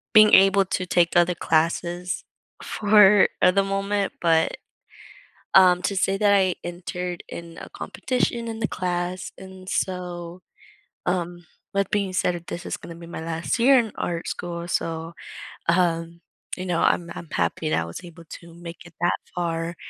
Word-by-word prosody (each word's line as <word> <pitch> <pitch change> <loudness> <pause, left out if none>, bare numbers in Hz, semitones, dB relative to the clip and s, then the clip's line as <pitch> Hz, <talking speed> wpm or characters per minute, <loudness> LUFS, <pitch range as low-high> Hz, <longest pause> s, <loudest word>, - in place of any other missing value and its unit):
Being 215 0 +8
able 195 +1 +7
to 185 -1 -3
take 175 -1 +2
other 175 0 +4
classes 170 +2 0 0.4
4 210 -1 +5
at 180 - +5
the 195 - +4
moment, 195 0 -1
but, 165 -1 +2 1.0
um, 180 -1 +6
to 200 +2 -1
say 195 +1 +1
that 205 0 +3
I 190 -3 +3
entered 175 0 -5
in 170 -1 -9
a - - -9
competition 245 -2 -2
in 225 -1 -5
the 215 - 0
class, 180 0 -3
and 190 0 -12
so, 180 -2 -3 0.7
um, 175 -1 -2 0.3
that 195 -1 0
being 200 -2 -1
said 180 -1 +1
that 170 0 -9
this 175 - -6
is - - -4
gonna 170 - -10
be 170 0 -11
my 170 - -7
last 165 +5 -2
year 260 +3 +6
in 225 -3 -2
art 170 -1 -3
school, 170 -1 -5
so, 165 -1 -3 0.6
um, 170 -1 +1 0.4
you 185 - -5
know, 175 -2 0
I'm 170 0 +1
I'm 170 - -9
happy 85 -2 -1
that 80 +1 +1
I - - -6
was 85 - -8
able 170 -1 -12
to 170 +2 -11
make 170 0 -10
it 175 - -15
that 175 +1 +1 0.2
far 170 -1 -2
175 Hz, 170 wpm, -24 LUFS, 170-190 Hz, 1.0 s, Being